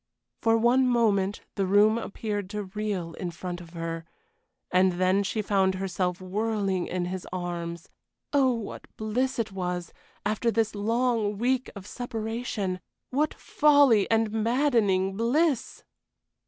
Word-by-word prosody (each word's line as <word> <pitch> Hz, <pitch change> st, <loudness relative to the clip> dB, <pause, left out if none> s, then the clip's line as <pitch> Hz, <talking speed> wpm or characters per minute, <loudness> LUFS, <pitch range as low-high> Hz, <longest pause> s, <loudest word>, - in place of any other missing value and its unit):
For 225 Hz, 0 st, +3 dB
one 245 Hz, +3 st, +4 dB
moment 210 Hz, -5 st, +2 dB
the 195 Hz, -2 st, -1 dB
room 210 Hz, +3 st, +5 dB
appeared 205 Hz, -3 st, -4 dB
to 210 Hz, 0 st, -3 dB
reel 195 Hz, -4 st, -3 dB
in 180 Hz, -, -4 dB
front 175 Hz, +1 st, -6 dB
of 170 Hz, -1 st, -13 dB
her, 165 Hz, -1 st, -4 dB, 0.7 s
and 185 Hz, 0 st, +4 dB
then 185 Hz, +2 st, +2 dB
she 210 Hz, +2 st, -1 dB
found 190 Hz, -2 st, +2 dB
herself 185 Hz, -1 st, -2 dB
whirling 195 Hz, -1 st, -1 dB
in 180 Hz, -1 st, -2 dB
his 185 Hz, 0 st, -5 dB
arms. 170 Hz, -2 st, -4 dB, 0.5 s
Oh, 270 Hz, -2 st, +4 dB
what 230 Hz, -4 st, -5 dB
bliss 245 Hz, +5 st, -1 dB
it 225 Hz, -3 st, -1 dB
was, 180 Hz, -2 st, -3 dB, 0.3 s
after 215 Hz, +3 st, +1 dB
this 225 Hz, -1 st, +1 dB
long 225 Hz, 0 st, 0 dB
week 255 Hz, +3 st, +1 dB
of 200 Hz, -2 st, -9 dB
separation! 225 Hz, -5 st, -3 dB, 0.3 s
What 295 Hz, +4 st, +1 dB
folly 285 Hz, -8 st, +4 dB
and 225 Hz, -1 st, +2 dB
maddening 220 Hz, -5 st, +2 dB
bliss! 260 Hz, +4 st, +1 dB
205 Hz, 135 wpm, -27 LUFS, 185-230 Hz, 0.7 s, room